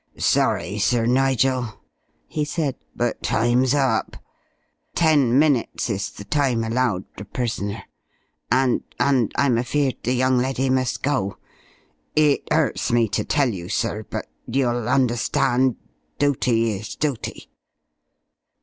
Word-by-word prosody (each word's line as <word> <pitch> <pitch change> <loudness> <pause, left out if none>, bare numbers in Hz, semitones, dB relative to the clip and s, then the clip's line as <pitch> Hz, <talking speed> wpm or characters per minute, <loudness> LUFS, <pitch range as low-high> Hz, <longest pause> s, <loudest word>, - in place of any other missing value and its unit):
"Sorry, 100 +5 +1
Sir 115 +2 +2
Nigel," 130 -2 +1 0.5
he 150 - -2
said, 150 -2 -2 0.2
"but 120 0 -1
time's 120 +4 +2
up. 130 -6 0 0.8
Ten 145 -7 +4
minutes 140 -5 +1
is 100 -1 -2
the - - -10
time 130 -1 +1
allowed 115 -4 0
a - - -6
prisoner, 105 -2 -3 0.7
and 130 0 +3 0.2
and 130 -6 +2
I'm 130 -5 +2
afeared 135 +2 0
the 125 - 0
young 130 0 +2
leddy 130 +1 0
must 130 -1 0
go. 130 -9 -1 0.8
It 150 -2 +3
'urts 155 -4 +1
me 115 -2 +3
to - - -1
tell 145 -4 +1
you, 90 -5 -6
sir, 115 -1 -1
but - - -4 0.2
you'll 120 -2 0
understand. 125 0 +2 0.4
Dooty 125 -5 +2
is 100 +1 -6
dooty." 145 -6 -4
125 Hz, 120 wpm, -22 LUFS, 115-135 Hz, 0.8 s, Ten